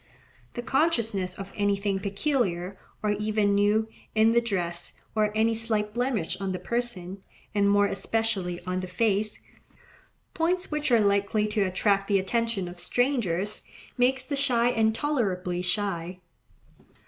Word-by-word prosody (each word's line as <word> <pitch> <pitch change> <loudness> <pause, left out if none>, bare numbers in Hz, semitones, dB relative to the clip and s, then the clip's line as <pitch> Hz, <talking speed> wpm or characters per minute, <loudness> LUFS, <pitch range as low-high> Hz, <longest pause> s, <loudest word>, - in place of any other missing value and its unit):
The 240 - -4
consciousness 230 - +1
of 195 0 -8
anything 200 -1 0
peculiar, 195 - -1 0.3
or 210 - +2
even 210 0 +1
new, 205 +2 +3 0.3
in 220 +1 +5
the 235 +1 +4
dress, 175 -7 -2
or 215 -1 +2
any 225 +1 +3
slight 220 -2 0
blemish 240 -9 -1
on 190 -1 -1
the - - -2
person, 200 -5 -3 0.3
and 200 -1 +3
more 205 0 +4
especially, 195 -3 -1
on 185 0 -1
the 185 - -4
face—points 225 - -3
which 300 -1 -1
are 235 -2 +5
likely 200 +1 +2
to 210 0 0
attract 195 +1 +1
the 200 - +3
attention 210 0 0
of 175 0 -8
strangers—makes 245 +3 -1
the 285 - -2
shy 245 -4 +2
intolerably 220 -7 0
shy. 180 -2 -2
210 Hz, 130 wpm, -27 LUFS, 195-235 Hz, 0.3 s, in